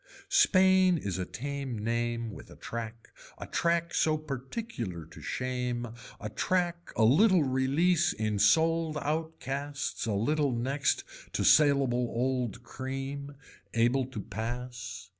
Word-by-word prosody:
Spain 190 - +5
is 95 - -3
a 90 - -1
tame 140 -2 -4
name 115 +1 -1
with - - -11
a - - -12
track 115 -1 -7 0.3
a - - -7
track 170 0 0
so 155 -1 +2
particular 135 - -5
to - - -13
shame, 125 -2 -2 0.3
a - - -5
track 175 - -1
a 110 - +3
little 175 - +5
release 145 +6 +2
in 105 -1 -2
sold 160 +9 +3
out 160 +2 -2
casts 140 -2 -3
a 110 - 0
little 145 +7 +1
next 135 +4 0 0.3
to - - 0
saleable 135 -5 +4
old 125 -1 -1
cream. 135 +3 -5 0.4
Able 120 +3 +2
to 130 -5 -6
pass. 120 -1 -6
130 Hz, 130 wpm, -30 LUFS, 115-155 Hz, 0.4 s, Spain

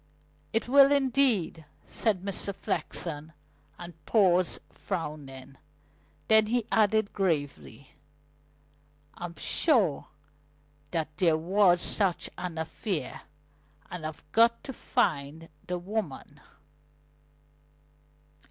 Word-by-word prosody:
"It 225 0 -1
will, 275 +2 +7
indeed," 260 - +2 0.2
said 205 -5 -1
Mr. 200 0 -3
Flexen, 155 -4 -4 0.4
and 170 -3 -11
paused, 185 -5 +3
frowning. 140 -7 -6 0.7
Then 220 -1 +5
he 235 0 0
added 215 -1 +2
gravely: 145 - -3 1.2
"I'm 175 0 -7
sure 220 - +2 0.8
that 160 -3 -3
there 165 -3 +3
was 180 +1 +3
such 195 -5 0
an 175 -2 -6
affair, 165 +3 -3 0.7
and 180 -3 -6
I've 155 0 -6
got 230 +1 +4
to 270 - -7
find 155 - -1 0.2
the 180 - -2
woman." 175 -6 -5
180 Hz, 90 wpm, -28 LUFS, 160-220 Hz, 1.2 s, will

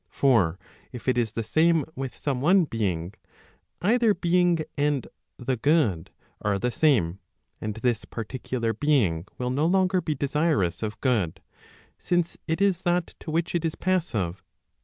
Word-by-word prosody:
For 110 - +3 0.3
if 125 -2 -9
it 130 - +3
is 115 -3 0
the 115 - -2
same 160 +5 +3
with 135 -2 -5
some 135 -4 -2
one 180 +6 +5
being, 95 - -2 0.7
either 225 +1 +3
being 175 -1 +2
and 145 -2 0 0.3
the 125 +1 -2
good 115 - +2 0.3
are 100 -1 +1
the 125 +5 -1
same, 110 - +2 0.4
and 110 -1 -3
this 115 -1 -1
particular 115 0 -3
being 105 - +1
will 125 0 -2
no 145 +5 +1
longer 185 0 +2
be 155 -2 -2
desirous 140 - 0
of 110 0 -4
good, 110 - +1 0.6
since 175 -1 0
it 160 +1 0
is 195 -3 +2
that 175 -1 0
to - - -9
which 165 +2 -1
it 170 -2 0
is 165 -1 -1
passive, 110 - -1
[i. - - -43
135 Hz, 160 wpm, -26 LUFS, 110-165 Hz, 0.7 s, one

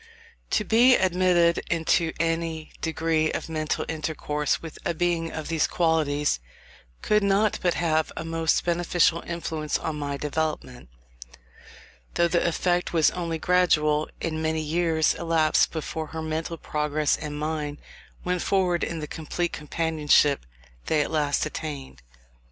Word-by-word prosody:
To 215 - +1
be 240 +4 +5
admitted 180 -2 +3
into 165 0 +1
any 165 -1 -2
degree 160 -1 0
of - - -4
mental 155 -1 -2
intercourse 150 -2 -2
with 165 -2 -9
a 170 - -1
being 165 -1 0
of 155 -1 -5
these 165 -2 +1
qualities, 150 - +1 0.6
could 210 0 +3
not 200 +2 +2
but 175 -2 +1
have 160 -2 +1
a 160 - -4
most 165 0 0
beneficial 170 -1 +2
influence 160 -3 -2
on 155 -2 -4
my 140 -1 -3
development; 150 - -3 1.3
though 170 - +4
the 170 0 +1
effect 175 +1 0
was 160 -3 +4
only 170 -2 -3
gradual, 155 -4 +2
and 160 -1 -3
many 160 0 0
years 160 0 +1
elapsed 165 -2 +2
before 160 0 -4
her 160 +1 -6
mental 160 +2 -3
progress 150 -1 0
and 150 -1 -6
mine 150 -1 -3 0.5
went 180 0 -1
forward 180 -3 +1
in 165 -1 -3
the 150 - -5
complete 165 +3 -3
companionship 150 - +2 0.4
they 155 -1 +2
at - - -6
last 150 -2 +1
attained. 145 - -6
160 Hz, 140 wpm, -25 LUFS, 155-170 Hz, 1.3 s, be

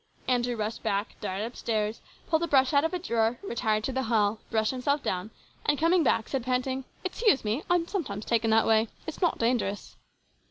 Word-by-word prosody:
Andrew 245 -1 +1
rushed 215 0 -3
back, 200 +2 -1
darted 205 +1 -2
upstairs, 220 -2 -2 0.3
pulled 320 -1 +2
a 340 - 0
brush 265 -2 +3
out 285 0 +5
of 325 - 0
a 365 - -1
drawer, 235 -8 0
retired 220 - 0
to 265 - -1
the 265 0 -1
hall, 215 -2 +2
brushed 220 -1 +1
himself 280 +3 0
down, 185 +3 -2 0.3
and 295 - +2
coming 335 +4 +3
back 230 -6 +2
said, 270 -3 -2
panting, 255 +1 -1
" - - -32
Excuse 375 - +2
me; 220 +7 0
I 350 - +5
am 335 -1 0
sometimes 240 - -3
taken 230 -1 +1
that 220 0 +4
way. 220 0 +4 0.2
It 320 - -4
is - - -14
not 350 - +2
dangerous." 230 -4 -1
240 Hz, 210 wpm, -28 LUFS, 220-290 Hz, 0.3 s, out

